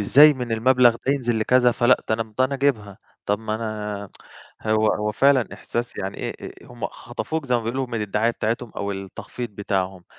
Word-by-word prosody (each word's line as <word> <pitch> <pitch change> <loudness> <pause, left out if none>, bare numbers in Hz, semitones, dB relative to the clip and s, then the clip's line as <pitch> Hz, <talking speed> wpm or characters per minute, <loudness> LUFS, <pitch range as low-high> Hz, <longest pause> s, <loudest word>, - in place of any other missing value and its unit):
إزاي 145 +9 +7
من 125 -4 -4
المبلغ 120 +1 +4
ده 140 - +4
ينزل 120 -5 0
لكذا، 125 +2 +4
فلأ 120 +2 +3
ده 110 - +3
أنا 115 - -1
امم 110 -1 -17
ده 130 - +5
أنا 135 +2 -2
أجيبها، 115 -8 0 0.3
طَب 105 0 +1
ما 110 -1 -3
أنا 105 -2 -4 0.5
هو 110 0 +2
هو 105 0 -2
فعلًا 135 0 +3
إحساس 120 0 -4
يعني 95 0 -4
إيه - - -3 0.2
أ - - -8
أ - - -16
هُم - - -5
خطفوك 160 -3 -5
زي 125 - +1
ما 120 - +1
بيقولوا 130 +4 -2
من 115 -3 -3
الدعاية 105 +3 +1
بتاعتهم 115 0 -2
أو 100 0 -2
التخفيض 95 +5 -7
بتاعهم. 95 -2 -3
115 Hz, 205 wpm, -23 LUFS, 105-125 Hz, 0.5 s, إزاي